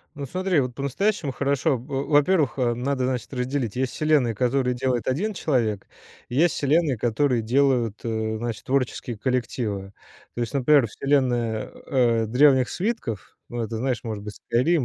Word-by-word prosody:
Ну, 140 -1 -5
смотри, 185 +2 +1
вот 125 -2 -3
по-настоящему 140 - -1
хорошо. 140 +1 +1
Во 135 +3 -4
во-первых, 145 -1 +3
э, 120 -2 +1
надо, 130 +2 -1
значит, 130 -1 -3
разделить: 125 -3 -2
есть 130 0 -1
вселенные, 150 -7 +2
которые 125 +2 +1
делает 125 -2 -1
1 180 +12 0
человек, 120 - -1 0.4
и - - -7
есть 170 +3 +4
вселенные, 145 -2 +2
которые 120 +2 +1
делают, 120 -2 +1
э, 110 -1 -2
значит, 115 -2 -4
творческие 130 -3 -1
коллективы. 110 -5 -2 0.4
То 120 - -2
есть, 115 - -4
например, 140 -1 +4
вселенная, 120 -3 0 0.2
э, 120 -4 +2
"Древних 130 +2 +4
свитков", 180 - -4
ну, 120 -1 -4
это, 110 +1 -4
знаешь, 125 -2 -1
может 110 -3 -4
быть, 105 0 -7
"Скайрим", 145 +5 +1
130 Hz, 160 wpm, -24 LUFS, 115-140 Hz, 0.4 s, есть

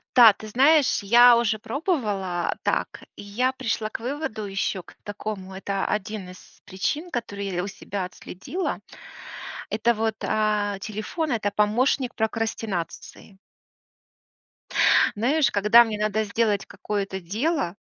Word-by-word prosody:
Да, 235 -3 +10
ты 215 - -11
знаешь, 275 +6 +4
я 240 +4 +7
уже 225 -2 +1
пробовала 215 - -2
так, - - -1
и - - -10
я 235 +6 0
пришла 225 -4 -2
к - - -6
выводу 245 -3 -4
еще 195 -1 -2
к - - -17
такому, 205 -2 -6
это 195 0 -2
1 210 -2 -3
из 185 - -15
причин, 295 - -3
которую 205 -8 -4
я 180 0 -2
у - - -4
себя 200 -1 -5
отследила. 190 - -5 0.9
Это 230 +2 +2
вот, 220 0 -1
а, 210 -2 0
телефон- 215 - -4
это 215 -4 0
помощник 240 +5 +1
прокрастинации. 220 -3 -4 1.8
Знаешь, 275 +8 +2
когда 210 +4 +6
мне 220 -2 -4
надо 215 +1 0
сделать 210 -1 0
какое-то 200 -1 -4
дело, 210 - -1
215 Hz, 125 wpm, -24 LUFS, 200-240 Hz, 1.8 s, Да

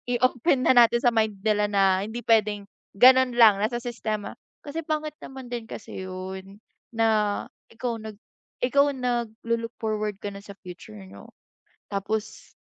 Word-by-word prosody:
I-open 255 +2 +1
na - - +6
natin 240 -1 +6
sa 240 0 +2
mind 220 -3 0
nila 210 -1 +2
na 195 -2 +3
hindi 220 +4 -6
pwedeng 210 -2 +2 0.3
ganun 255 +1 +6
lang, 215 -4 +6
nasa 225 +3 0
sistema 230 -3 -4 0.3
kasi 300 +3 -4
pangit 305 -1 -2
naman 265 -1 -9
din 240 -2 -5
kasi 190 -3 -8
yun, 190 +1 -8 0.4
na 225 0 +2 0.6
ikaw 230 0 -4
nag 220 0 -8 0.5
ikaw 280 +3 +3
naglu-look 230 -2 -3
forward 215 -2 -2
ka 205 - -4
na - - -8
sa 200 0 -11
future 175 -12 -10
niyo 95 +1 -13 0.6
tapos 210 +2 -4
225 Hz, 145 wpm, -25 LUFS, 205-245 Hz, 0.6 s, na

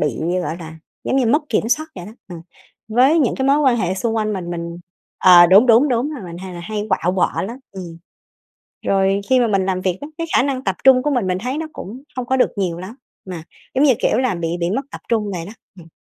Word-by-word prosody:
bị 145 -6 -1 0.2
gọi 165 - -4
là, 160 -1 -10 0.3
giống 265 - 0
như 255 -3 +2
mất 295 +7 +2
kiểm 225 0 0
soát 310 +6 +1
vậy 175 - -8
đó, 215 - -10 0.2
ừm, 170 -2 -8 0.5
với 260 +8 +4
những 265 -7 +2
cái 265 - -1
mối 280 +2 +4
quan 265 -5 +3
hệ 185 -4 -1
xung 225 +4 -2
quanh 215 -1 0
mình. 180 -3 -5
Mình 170 0 -5 0.4
ờ, 175 -2 +8
đúng, 200 +8 +6
đúng, 240 +5 +5
đúng 250 +4 0
rồi. 265 -11 -7
Mình 170 0 -8
hay 185 -1 -8
là 175 - -7
hay 210 +3 -4
quạu 180 -2 0
quọ 185 - 0
lắm, 235 +7 -6
ừm. 175 -3 -9 0.9
Rồi 195 0 +2
khi 255 -1 +5
mà 240 - +3
mình 195 -2 +1
làm 185 -1 -1
việc 185 -1 -1
á, 290 - -7
cái 330 - -2
khả - - +5
năng 270 -1 -2
tập 190 - -1
trung 255 -1 +6
của 295 - 0
mình, 245 -8 0
mình 185 0 -1
thấy 255 +7 -3
nó 320 - -3
cũng 240 +8 -9
không 250 -1 -3
có 265 - +1
được 255 - +3
nhiều 175 -4 -2
lắm, 195 +7 -9 0.3
mà 175 -4 -6 0.3
giống 275 +3 +3
như, 265 - +5
kiểu 220 - +1
là, 255 -7 +1
bị 170 -1 -3
bị 170 +1 0
mất 265 +7 -1
tập - - -9
trung 215 -3 0
vậy 170 -1 -5
đó, 205 - -9 0.3
ừm. 165 - -13
210 Hz, 260 wpm, -19 LUFS, 180-255 Hz, 0.9 s, ờ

